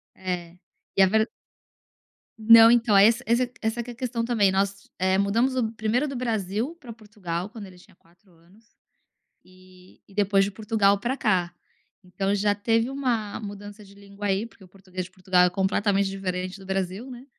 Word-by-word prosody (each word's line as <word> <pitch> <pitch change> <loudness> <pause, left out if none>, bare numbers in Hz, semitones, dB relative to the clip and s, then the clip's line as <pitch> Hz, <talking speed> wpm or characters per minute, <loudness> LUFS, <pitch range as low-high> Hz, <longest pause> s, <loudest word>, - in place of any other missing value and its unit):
é, 180 -2 -5 0.4
e - - +5
a - - +8
ver 220 +3 +1 1.1
Não, 225 +1 +8
então, 230 -4 +3
é 195 - +8
esse 230 +4 +2
essa 235 +2 +3 0.2
essa 225 +2 -2
que 245 - -8
é - - -9
a - - -17
questão 235 -1 -3
também, 220 -5 +2
nós, 195 +1 -2
eh, 190 +1 +1
mudamos 230 +7 +1
o 225 -4 0
primeiro 225 +6 0
do 275 - -6
Brasil 225 - -2
pra 250 -7 -10
Portugal 205 -5 -6
quando 215 -3 -10
ele 185 - -15
tinha 185 +1 -20
4 175 +3 -29
anos, 175 +7 -24 0.8
e 185 0 -20
e 200 - -19
depois 200 -1 +2
de 200 - -2
Portugal 210 -1 +1
pra 245 +6 -2
cá. 180 -8 0 0.5
Então 195 +2 -2
já 205 0 +1
teve 225 +3 0
uma 245 -7 -2
mudança 205 0 -9
de 200 -1 -17
língua 200 0 -7
aí, 195 +3 0
porque 225 -3 -17
o 185 - -15
português 185 -1 -8
de 185 - -15
Portugal 185 -1 +2
é - - +2
completamente 195 +1 0
diferente 185 0 -4
do 190 - -13
Brasil, 190 +5 -3
né. 250 +1 -10
200 Hz, 190 wpm, -25 LUFS, 190-225 Hz, 1.1 s, a